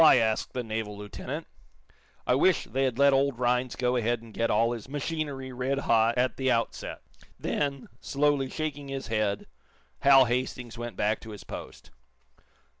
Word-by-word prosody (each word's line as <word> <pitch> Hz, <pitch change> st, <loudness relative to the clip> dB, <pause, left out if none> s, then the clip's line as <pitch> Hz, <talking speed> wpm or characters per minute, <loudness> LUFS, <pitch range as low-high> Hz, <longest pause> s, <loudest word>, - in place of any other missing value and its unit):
asked 115 Hz, -8 st, +5 dB
the 125 Hz, -, -2 dB
naval 110 Hz, -2 st, -4 dB
lieutenant. 105 Hz, 0 st, -6 dB, 0.8 s
"I -, -, +3 dB
wish 165 Hz, +7 st, +4 dB
they 135 Hz, +1 st, 0 dB
had 125 Hz, -3 st, -1 dB
let 140 Hz, 0 st, +6 dB
old 135 Hz, -2 st, +2 dB
Rhinds 125 Hz, 0 st, +1 dB
go 125 Hz, 0 st, +1 dB
ahead 120 Hz, 0 st, +1 dB
and 115 Hz, -2 st, -13 dB
get 115 Hz, -, 0 dB
all 115 Hz, +1 st, +3 dB
his 120 Hz, 0 st, -6 dB
machinery 145 Hz, -2 st, -3 dB
red 130 Hz, +2 st, -1 dB
hot 115 Hz, -2 st, +3 dB
at 125 Hz, +1 st, +1 dB
the 130 Hz, -1 st, +1 dB
outset." 115 Hz, -2 st, -1 dB, 0.4 s
Then, 140 Hz, -2 st, -2 dB
slowly 140 Hz, -1 st, +1 dB
shaking 145 Hz, -2 st, -4 dB
his 135 Hz, -2 st, -5 dB
head, 105 Hz, -2 st, 0 dB, 0.5 s
Hal 135 Hz, -1 st, +7 dB
Hastings 125 Hz, 0 st, -2 dB
went 120 Hz, 0 st, -6 dB
back 105 Hz, +1 st, +1 dB
to 115 Hz, -, -11 dB
his 105 Hz, -1 st, -9 dB
post. -, -, -9 dB
125 Hz, 165 wpm, -28 LUFS, 115-135 Hz, 0.8 s, Hal